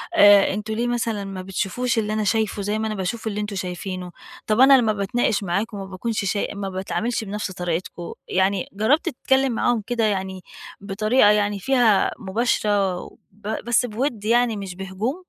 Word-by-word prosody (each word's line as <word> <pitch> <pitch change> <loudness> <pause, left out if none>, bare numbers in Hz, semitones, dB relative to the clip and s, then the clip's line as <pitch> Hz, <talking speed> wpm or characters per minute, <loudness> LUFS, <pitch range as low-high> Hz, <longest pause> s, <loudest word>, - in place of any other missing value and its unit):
آآ 205 -1 +7
أنتم 215 +1 -4
ليه 235 +2 -1
مثلًا 230 -4 -1
ما 195 -1 -6
بتشوفوش 205 +6 -2
اللي 215 0 -2
أنا 215 0 0
شايفُه 215 -1 0
زي 210 +2 -1
ما 220 - -1
أنا 215 - -3
باشوف 200 +4 -3
اللي 210 0 -2
أنتم 205 -1 -4
شايفينُه، 180 0 -5 0.4
طَب 215 +1 +1
أنا 270 +1 +8
لمّا 220 -3 +2
باتناقش 205 +1 0
معاكم 200 +4 -2
ما 195 - -5
باكونش 200 +3 -3
شاي 200 +1 0
ما 200 -1 -4
باتعاملش 220 +5 -2
بنفس 205 -1 -4
طريقتكم، 175 -1 -4
يعني 190 0 0
جرّبت 265 - +2
تتكلِّم 265 0 +1
معاهم 235 0 +1
كده، 240 -2 0
يعني 190 -2 -2 0.4
بطريقة 215 +3 +3
يعني 205 -1 +1
فيها 240 -3 +3
مباشرة 205 -2 +1
و - - -13
ب 205 +1 -12 0.2
بس 240 +1 +2
بوِدّ 230 -1 -3
يعني 235 -1 +2
مش 195 -2 -6
بهجوم؟ 195 - -4
210 Hz, 175 wpm, -23 LUFS, 195-230 Hz, 0.4 s, أنا